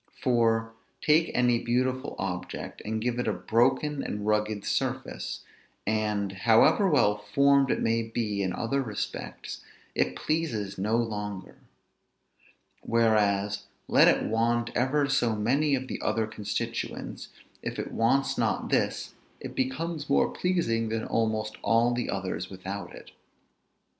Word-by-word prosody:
For, 115 Hz, -2 st, +2 dB, 0.3 s
take 160 Hz, +2 st, +3 dB
any 125 Hz, -1 st, +3 dB
beautiful 130 Hz, +3 st, -1 dB
object, 90 Hz, -2 st, -5 dB
and 110 Hz, +1 st, -2 dB
give 120 Hz, +2 st, -1 dB
it 125 Hz, -, -1 dB
a 110 Hz, -, +2 dB
broken, 125 Hz, +9 st, +1 dB
and 105 Hz, 0 st, -4 dB
rugged 105 Hz, -1 st, 0 dB
surface; -, -, -2 dB, 0.4 s
and, 105 Hz, -2 st, 0 dB
however 115 Hz, -, +4 dB
well 105 Hz, -9 st, +3 dB
formed 140 Hz, +6 st, +3 dB
it -, -, 0 dB
may 115 Hz, 0 st, +2 dB
be 110 Hz, -3 st, -2 dB
in 95 Hz, -1 st, 0 dB
other 125 Hz, +8 st, -1 dB
respects, 110 Hz, -6 st, -5 dB, 0.3 s
it 65 Hz, -, 0 dB
pleases 110 Hz, -, -2 dB
no 105 Hz, +4 st, +1 dB
longer. 105 Hz, -4 st, -4 dB, 1.2 s
Whereas, 105 Hz, -3 st, +2 dB, 0.2 s
let -, -, +6 dB
it -, -, +4 dB
want 120 Hz, +1 st, +1 dB
ever 140 Hz, +3 st, +2 dB
so 120 Hz, -4 st, +2 dB
many 135 Hz, +7 st, +2 dB
of 130 Hz, 0 st, -4 dB
the -, -, -5 dB
other 110 Hz, -, +1 dB
constituents, 105 Hz, -2 st, -4 dB, 0.3 s
if -, -, -4 dB
it -, -, -4 dB
wants 135 Hz, +5 st, +1 dB
not -, -, 0 dB
this, -, -, 0 dB, 0.3 s
it -, -, -7 dB
becomes 145 Hz, +4 st, -2 dB
more 140 Hz, -, +3 dB
pleasing 115 Hz, -12 st, 0 dB
than 110 Hz, 0 st, -2 dB
almost 110 Hz, -1 st, -1 dB
all 115 Hz, +1 st, +3 dB
the 120 Hz, 0 st, -2 dB
others 95 Hz, -2 st, -3 dB
without 95 Hz, -1 st, -6 dB
it. -, -, -13 dB
115 Hz, 135 wpm, -28 LUFS, 105-130 Hz, 1.2 s, let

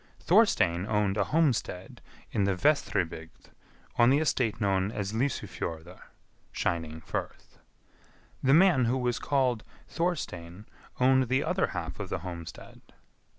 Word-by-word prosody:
Thorstein 85 Hz, +2 st, +3 dB
owned 105 Hz, -2 st, +1 dB
a 100 Hz, -2 st, +1 dB
homestead 130 Hz, -, -1 dB, 0.3 s
in 100 Hz, -, +1 dB
the 100 Hz, -1 st, +1 dB
Vestribygd 90 Hz, -, -1 dB, 0.5 s
on 120 Hz, +1 st, +6 dB
the 135 Hz, -, +5 dB
estate 130 Hz, -7 st, 0 dB
known 100 Hz, -1 st, +1 dB
as 105 Hz, -2 st, -4 dB
Lysufjordr 90 Hz, -, -3 dB, 0.5 s
(shining 80 Hz, -2 st, -2 dB
firth). -, -, -6 dB, 0.8 s
The 135 Hz, +2 st, +4 dB
man 165 Hz, -8 st, +5 dB
who 125 Hz, +3 st, +1 dB
was 125 Hz, -1 st, -1 dB
called 130 Hz, -5 st, 0 dB, 0.2 s
Thorstein 105 Hz, -, -3 dB, 0.3 s
owned 130 Hz, 0 st, +4 dB
the 130 Hz, +2 st, +2 dB
other -, -, 0 dB
half -, -, -5 dB
of -, -, -5 dB
the -, -, -2 dB
homestead. 85 Hz, -2 st, -9 dB
110 Hz, 125 wpm, -28 LUFS, 90-130 Hz, 0.8 s, on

